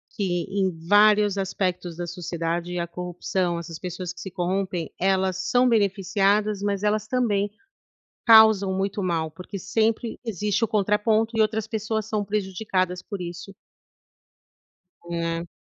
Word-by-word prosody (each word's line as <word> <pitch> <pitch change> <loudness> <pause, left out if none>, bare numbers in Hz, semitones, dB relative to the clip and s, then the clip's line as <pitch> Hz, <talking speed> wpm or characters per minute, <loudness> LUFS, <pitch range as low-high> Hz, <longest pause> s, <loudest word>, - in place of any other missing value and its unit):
que 175 -4 -1
em 195 -1 +1 0.2
vários 205 0 +5
aspectos 180 -2 -2
da 175 0 -4
sociedade, 175 0 -3
a 170 - -2
corrupção, 180 0 -2
essas 165 -1 -8
pessoas 180 -1 -5
que 180 - -13
se 190 - -7
corrompem, 180 -2 -2
elas 190 0 +1
são 250 0 +4
beneficiadas, 200 0 +2
mas 200 -1 -1
elas 210 0 +1
também 210 -5 0 0.8
causam 220 -4 +7
muito 195 +1 -2
mal, 165 -3 -1
porque 180 +5 -9
sempre 225 +4 0
existe 210 0 0
o 225 - -2
contraponto 215 +2 +1
e - - +2
outras 215 0 0
pessoas 220 -1 -2
são 215 -2 -1
prejudicadas 190 -2 -1
por 200 -1 -7
isso. 175 +3 -8 1.5
Hum. 170 0 -3
195 Hz, 135 wpm, -24 LUFS, 180-210 Hz, 1.5 s, causam